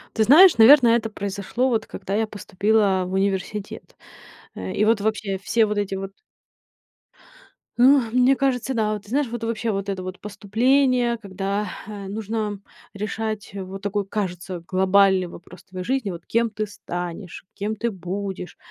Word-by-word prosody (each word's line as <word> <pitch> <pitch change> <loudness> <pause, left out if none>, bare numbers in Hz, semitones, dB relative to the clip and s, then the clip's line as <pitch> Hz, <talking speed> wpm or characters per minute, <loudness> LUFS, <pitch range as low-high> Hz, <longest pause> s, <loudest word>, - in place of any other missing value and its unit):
Ты 220 - +3
знаешь, 315 - +7
наверно, 245 +3 +8
это 230 -1 +2
произошло, 200 +5 -2
вот 225 -2 0
когда 195 - -5
я 220 +1 +1
поступила 205 -1 +1
в 185 - -6
университет. 195 +1 -3 0.6
Э, 95 0 -5
и 210 - +1
вот 220 -1 +3
вообще, 205 -2 -1
все 220 +3 +2
вот 210 0 -2
эти 200 -1 -2
вот 195 0 -5 1.7
ну, 265 +3 +6
мне 255 +2 +4
кажется, 265 -1 0
да, 215 -3 0
вот 210 -1 -6
ты 205 - -17
знаешь, 280 +3 +1
вот 235 0 -5
вообще, 225 0 -1
вот 195 -1 -3
это 190 -2 -3
вот 185 0 -7
поступление, 240 +4 +1
когда, 200 -1 -3 0.2
э, 205 -2 -7
нужно 210 0 -3 0.3
решать, 215 +1 -4
вот 195 0 -7
такой, 205 0 -2
кажется, 185 -3 -4
глобальный 190 0 +3
вопрос 175 +1 -13
твоей 185 -1 -8
жизни. 260 -6 -1
Вот 170 -1 -9
кем 230 0 +1
ты 215 0 -4
станешь, 175 -2 -7
кем 210 +2 -3
ты 235 +2 -1
будешь. 190 0 -6
205 Hz, 160 wpm, -23 LUFS, 195-225 Hz, 1.7 s, наверно